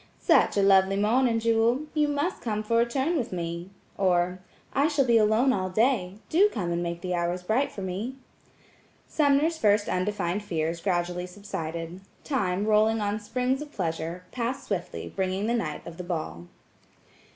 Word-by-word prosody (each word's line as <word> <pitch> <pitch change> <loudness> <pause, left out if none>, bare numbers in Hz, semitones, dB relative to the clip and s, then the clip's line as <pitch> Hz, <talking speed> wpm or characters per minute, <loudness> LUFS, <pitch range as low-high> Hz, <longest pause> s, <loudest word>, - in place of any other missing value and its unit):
"Such - - +3
a 200 - +4
lovely 195 0 +5
morning, 230 +4 +2
Jewel! 230 +3 +2
You 300 -1 +2
must 290 +6 -1
come 215 -2 -2
for 230 +2 +2
a 235 - +2
turn 270 +8 0
with 255 -8 -2
me." 170 0 -4 0.3
or, 180 -1 +2 0.3
"I 280 +2 +3
shall 290 -4 +2
be 235 -2 +5
alone 220 +5 +3
all 185 -1 -1
day; 205 -2 +1
do 390 +6 +4
come 180 - -3
and 170 0 -1
make 170 0 -3
the 180 -1 -2
hours 175 +1 -1
bright 230 +9 +1
for 195 - -7
me." 200 +8 -4 0.9
Sumner's 300 +2 +2
first 205 -1 +3
undefined 185 0 -1
fears 165 -4 -2
gradually 180 -1 -1
subsided. 170 -2 -6 0.2
Time, 200 -8 0
rolling 215 +1 +3
on 205 0 -1
springs 250 +5 -1
of 295 -1 -8
pleasure, 170 - -3
passed 250 +2 -3
swiftly 185 -4 -4
bringing 190 +1 -1
the 235 - +1
night 160 -11 -3
of 170 -1 -9
the 180 - -5
ball. 120 - -4
205 Hz, 170 wpm, -27 LUFS, 180-240 Hz, 0.9 s, lovely